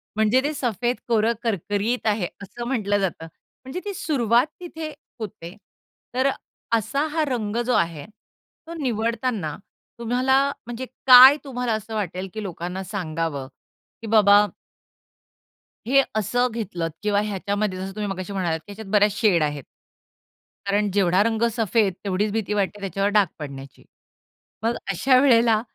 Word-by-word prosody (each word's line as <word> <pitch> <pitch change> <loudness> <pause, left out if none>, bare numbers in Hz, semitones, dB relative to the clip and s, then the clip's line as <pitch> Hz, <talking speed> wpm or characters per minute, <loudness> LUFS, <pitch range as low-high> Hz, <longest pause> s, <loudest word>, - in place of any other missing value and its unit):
म्हणजे 220 +4 +3
ते 300 +1 -1
सफेद 245 -2 -1
कोरं 230 0 +2
करकरीत 205 +3 -1
आहे, 205 -4 +1 0.2
असं 235 +5 -7
म्हटलं 205 -6 0
जातं. 180 -4 -2 0.4
म्हणजे 265 +8 -5
ती 405 - -3
सुरुवात 250 - +2
तिथे 325 -3 -6 0.3
होते. 180 -4 -7 0.6
तर 260 +2 +2
अ, - - +3 0.5
असा 275 +8 -1
हा 315 0 +1
रंग 225 -4 -2
जो 250 - +1
आहे, 165 -6 0 0.6
तो 335 - -7
निवडताना 225 - -1 0.4
तुम्हाला 250 +3 +1 0.3
म्हणजे 240 +2 -5 0.2
काय 260 +3 +10
तुम्हाला 250 -4 -2
असं 220 +1 -5
वाटेल 190 -2 -3
की 215 -1 -5
लोकांना 180 +1 -5
सांगावं 165 -8 -3 0.5
की 225 - -7
बाबा 205 -1 +6 1.4
हे 275 +3 +5 0.2
असं 245 +4 +1
घेतलंत 180 -7 -3
किंवा 205 -1 +2
ह्याच्यामध्ये 200 -1 -2
जसं 190 +1 -5
तुम्ही 210 -1 -3
मगाशी 185 +1 -5
म्हणालात 175 -4 -1
की - - -24
ह्याच्यात 205 -1 -9
बऱ्याच 210 -1 +4
शेड 190 -8 +4
आहेत. 145 -2 -1 1.0
कारण 205 +1 +1
जेवढा 190 0 +3
रंग 225 0 0
सफेद 215 -3 +2
तेवढीच 200 +2 0
भीती 215 -2 -1
वाटते 205 0 -1
त्याच्यावर 195 +1 -1
डाग 205 -3 +5
पडण्याची. 135 -2 -9 0.8
मग 230 +1 0
अशा 255 +7 +3
वेळेला 230 -5 +4
210 Hz, 140 wpm, -23 LUFS, 190-240 Hz, 1.4 s, काय